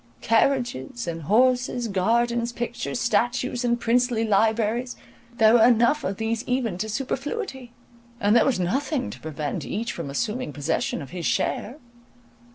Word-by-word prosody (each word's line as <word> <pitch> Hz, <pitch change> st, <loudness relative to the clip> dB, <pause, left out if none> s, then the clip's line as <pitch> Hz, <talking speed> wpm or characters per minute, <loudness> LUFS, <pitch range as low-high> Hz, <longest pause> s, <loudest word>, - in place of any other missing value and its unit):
Carriages 245 Hz, +1 st, 0 dB
and 165 Hz, -1 st, -4 dB
horses, 245 Hz, -, +2 dB
gardens, 235 Hz, +4 st, +1 dB
pictures, 240 Hz, 0 st, -4 dB
statues, 240 Hz, +2 st, 0 dB
and 240 Hz, 0 st, +1 dB
princely 240 Hz, -1 st, +1 dB
libraries, 225 Hz, +3 st, +1 dB, 0.4 s
there 220 Hz, 0 st, +6 dB
were 235 Hz, -2 st, +6 dB
enough 240 Hz, +5 st, +4 dB
of 195 Hz, 0 st, -2 dB
these 225 Hz, +1 st, -2 dB
even 245 Hz, -8 st, -1 dB
to 220 Hz, +2 st, -3 dB
superfluity; 270 Hz, -, -4 dB, 0.5 s
and 210 Hz, 0 st, +3 dB
there 235 Hz, -, +6 dB
was 260 Hz, -8 st, +1 dB
nothing 265 Hz, -, -1 dB
to -, -, -10 dB
prevent 150 Hz, -2 st, -4 dB
each 230 Hz, +2 st, -3 dB
from 165 Hz, -5 st, -6 dB
assuming 210 Hz, -, -3 dB
possession 145 Hz, 0 st, -2 dB
of 135 Hz, -, -12 dB
his 175 Hz, -2 st, -3 dB
share. 245 Hz, +7 st, -1 dB
235 Hz, 145 wpm, -24 LUFS, 210-245 Hz, 0.5 s, there